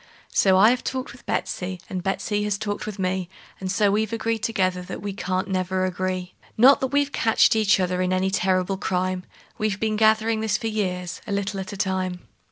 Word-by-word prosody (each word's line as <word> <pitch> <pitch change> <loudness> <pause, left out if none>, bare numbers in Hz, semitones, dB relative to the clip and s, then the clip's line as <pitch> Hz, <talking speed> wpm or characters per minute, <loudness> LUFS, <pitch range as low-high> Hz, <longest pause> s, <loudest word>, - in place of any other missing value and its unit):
So 190 -1 +4
I 210 +4 +7
have 250 - -1
talked 260 0 -3
with 245 - -16
Betsey, 185 0 -2
and 185 -1 -4
Betsey 205 +2 -1
has 205 -1 0
talked 205 0 -4
with 210 -2 -5
me, 185 -1 -1 0.3
And 185 -1 -3
so 200 0 +3
we've 215 +1 0
agreed 230 0 -1
together 185 -5 0
that 180 - -7
we 200 +1 -4
can't 185 0 -2
never 185 0 0
agree; 185 0 -3 0.2
Not 260 +5 +7
that 265 - +1
we've 285 +1 +1
catched 225 -2 +3
each 210 -2 +3
other 180 0 0
in 185 0 0
any 185 +1 +1
terrible 190 0 +1
crime; 185 -1 -1 0.3
We've 215 -2 -1
been 220 -1 0
a - - -1
gathering 220 +1 +3
this 220 -2 +1
for - - -8
years, 185 -5 -2
a - - -4
little 200 0 -1
at 190 0 -5
a - - -7
time. 185 -2 -1
195 Hz, 210 wpm, -24 LUFS, 185-215 Hz, 0.3 s, I